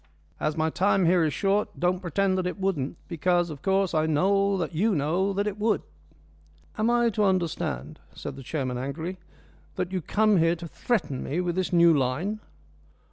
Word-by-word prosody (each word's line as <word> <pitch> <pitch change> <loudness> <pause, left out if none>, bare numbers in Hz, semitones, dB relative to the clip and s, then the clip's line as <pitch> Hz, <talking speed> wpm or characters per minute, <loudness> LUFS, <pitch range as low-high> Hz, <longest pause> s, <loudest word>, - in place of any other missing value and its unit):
As 155 +1 -1
my 160 0 +1
time 195 +1 +2
here 175 0 +4
is 155 - +1
short, 200 +4 0
don't 180 +1 +1
pretend 185 +2 0
that 180 - -1
it 180 - -5
wouldn't, 170 -6 -1
because, 175 0 +1
of 140 -3 -9
course, 195 -1 +1
I 155 0 +2
know 195 +5 +2
that 175 -1 -3
you 200 +6 +2
know 170 +7 +1
that 200 +1 0
it 210 0 -3
would." 215 0 +1 0.9
"Am 215 +2 +1
I 240 -1 +3
to 210 0 0
understand," 170 - -1 0.2
said - - -6
the 135 - -9
chairman, 130 -2 -3
angrily, 160 +8 -5 0.6
"that 185 -1 -3
you 185 -1 -2
come 215 +4 +2
here 165 0 +3
to 170 0 -8
threaten 155 - -2
me 155 - -2
with 175 -1 -1
this 185 0 -1
new 170 -2 +6
line?" 150 +11 -1
180 Hz, 190 wpm, -26 LUFS, 160-195 Hz, 0.9 s, new